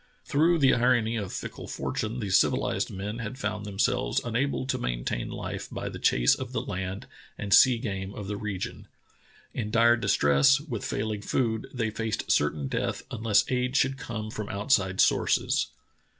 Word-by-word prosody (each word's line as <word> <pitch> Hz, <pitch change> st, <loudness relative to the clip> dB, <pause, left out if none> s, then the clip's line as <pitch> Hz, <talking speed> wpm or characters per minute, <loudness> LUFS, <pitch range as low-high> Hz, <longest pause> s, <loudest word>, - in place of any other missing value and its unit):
Through 165 Hz, +4 st, +3 dB
the 135 Hz, -4 st, +4 dB
irony 120 Hz, -2 st, +2 dB
of 100 Hz, -4 st, -4 dB
fickle -, -, -6 dB
fortune 115 Hz, +3 st, -3 dB
the 100 Hz, -3 st, -3 dB
civilized 95 Hz, -, +2 dB
men 105 Hz, +4 st, -5 dB
had 115 Hz, +2 st, -5 dB
found 105 Hz, -2 st, -3 dB
themselves 115 Hz, +5 st, 0 dB
unable 125 Hz, +4 st, -1 dB
to 135 Hz, -, -1 dB
maintain -, -, -2 dB
life -, -, -5 dB
by -, -, -5 dB
the -, -, -8 dB
chase -, -, +4 dB
of -, -, -5 dB
the -, -, 0 dB
land 95 Hz, +1 st, -5 dB, 0.3 s
and 100 Hz, -1 st, -1 dB
sea 130 Hz, -2 st, +7 dB
game 95 Hz, -5 st, -4 dB
of 105 Hz, -, -6 dB
the 105 Hz, -, -3 dB
region. 100 Hz, -3 st, -5 dB, 0.7 s
In 105 Hz, -3 st, -3 dB
dire 115 Hz, +1 st, +5 dB
distress, 100 Hz, -, +4 dB
with 140 Hz, -8 st, -5 dB
failing 105 Hz, -1 st, -2 dB
food, 110 Hz, +1 st, -1 dB
they 115 Hz, -4 st, -2 dB
faced 110 Hz, 0 st, -2 dB
certain 75 Hz, -1 st, +1 dB
death -, -, -2 dB
un 120 Hz, -4 st, -5 dB
less 110 Hz, -3 st, +4 dB
aid 125 Hz, +1 st, 0 dB
should 135 Hz, +1 st, +1 dB
come 110 Hz, -3 st, -5 dB
from 105 Hz, -1 st, -5 dB
outside 100 Hz, -3 st, +1 dB
sources. -, -, +2 dB
110 Hz, 170 wpm, -27 LUFS, 100-125 Hz, 0.7 s, sea